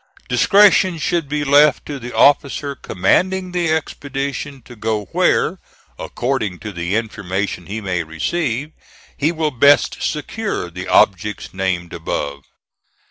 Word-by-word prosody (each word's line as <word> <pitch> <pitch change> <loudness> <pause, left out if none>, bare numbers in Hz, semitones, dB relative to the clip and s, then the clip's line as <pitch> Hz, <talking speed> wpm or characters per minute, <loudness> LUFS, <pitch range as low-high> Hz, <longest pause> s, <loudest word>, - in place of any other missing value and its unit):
Discretion 195 -3 +4
should 165 -1 -1
be 150 0 -1
left 145 0 +4
to 145 -2 -6
the 120 0 -7
officer 140 +1 +3
commanding 185 - 0
the 175 -2 0
expedition 140 -3 -3
to 120 - -13
go 110 -1 -2
where, - - +2 0.4
according 120 -8 -2
to 105 - -6
the 85 +1 -3
information 100 -5 -3
he 110 +3 -4
may 90 -3 -1
receive, 130 - -2 0.4
he 150 +3 +1
will 160 -2 -1
best 140 +3 +4
secure 155 - -3
the 90 +2 -7
objects 105 0 +2
named 95 -2 -2
above. 70 -4 -4
130 Hz, 130 wpm, -19 LUFS, 95-150 Hz, 0.4 s, Discretion